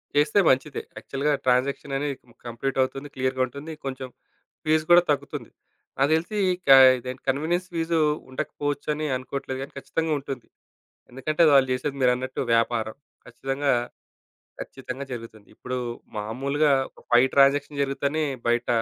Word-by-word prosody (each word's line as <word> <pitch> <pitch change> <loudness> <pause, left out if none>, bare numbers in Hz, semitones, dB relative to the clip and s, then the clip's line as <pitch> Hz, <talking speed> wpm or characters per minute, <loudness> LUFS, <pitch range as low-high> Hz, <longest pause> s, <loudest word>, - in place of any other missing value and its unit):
చేస్తే 150 +6 +4
మంచిదే. 135 +2 +1 0.2
యాక్చువల్‌గా 145 +2 -1
ట్రాన్సాక్షననేది 135 +2 0
ము - - -19
కంప్లీటవుతుంది. 135 +3 -2
క్లియర్‌గుంటుంది. 130 +4 -2
కొంచెం 130 -1 -5 0.6
ఫీస్ 155 0 +3
కూడా 175 0 +9
తగ్గుతుంది. 145 - -3 0.5
నాకు 135 +1 +3
తెలిసి 170 +7 -2 0.3
కా 135 - +10 0.2
ఇదేంటి 125 +1 -7
కన్వీనియన్స్ 165 +7 0
ఫీజూ 165 0 0 0.3
ఉండకపోవచ్చు 145 +1 -4
అని 155 +1 -3
అనుకోవట్లేదు 130 +1 -5
కానీ, 135 - -7
ఖచ్చితంగా 160 +3 -2
ఉంటుంది. 135 -3 -7 0.6
ఎందుకంటే, 150 +6 0
వాళ్ళు 135 -1 +6
చేసేది 140 +2 -3
మీరన్నట్టు 125 +1 +1
వ్యాపారం, 115 -1 +1 0.3
ఖచ్చితంగా 135 +1 -1 0.9
ఖచ్చితంగా 135 +1 -7
జరుగుతుంది. 115 -3 -8
ఇప్పుడు 125 0 -5 0.4
మామూలుగా 135 +8 0 0.2
ఒక - - -19
5 120 +2 +6
ట్రాన్సాక్షన్ 140 +1 +3
జరుగుతేనే 140 +3 -1 0.2
బయట 120 0 +1
135 Hz, 120 wpm, -25 LUFS, 130-145 Hz, 0.9 s, కా